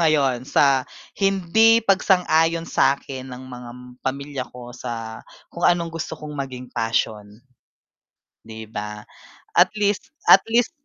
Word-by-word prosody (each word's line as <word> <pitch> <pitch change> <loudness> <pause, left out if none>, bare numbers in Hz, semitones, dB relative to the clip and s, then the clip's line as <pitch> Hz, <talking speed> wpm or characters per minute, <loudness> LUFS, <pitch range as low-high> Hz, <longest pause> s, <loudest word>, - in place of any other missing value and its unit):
ngayon 140 -6 +2
sa 135 -2 +4 0.3
hindi 195 +4 +4
pagsang-ayon 165 -4 +3
sakin 130 -1 0
ng 125 +1 -8
mga 125 -1 -9 0.3
pamilya 140 0 -3
ko 120 0 -10
sa 115 -2 -6 0.3
kung 170 - -8
anong 170 -1 0
gusto 160 -1 -5
kong 150 -1 -8
maging 130 -2 -6
passion. 105 -2 -2 1.0
'Di 110 0 -9
ba? 105 -1 -7 0.5
At 185 +3 +5
least 205 +8 -1 0.2
at 195 - +8
least 230 +1 +2
140 Hz, 120 wpm, -22 LUFS, 120-175 Hz, 1.0 s, at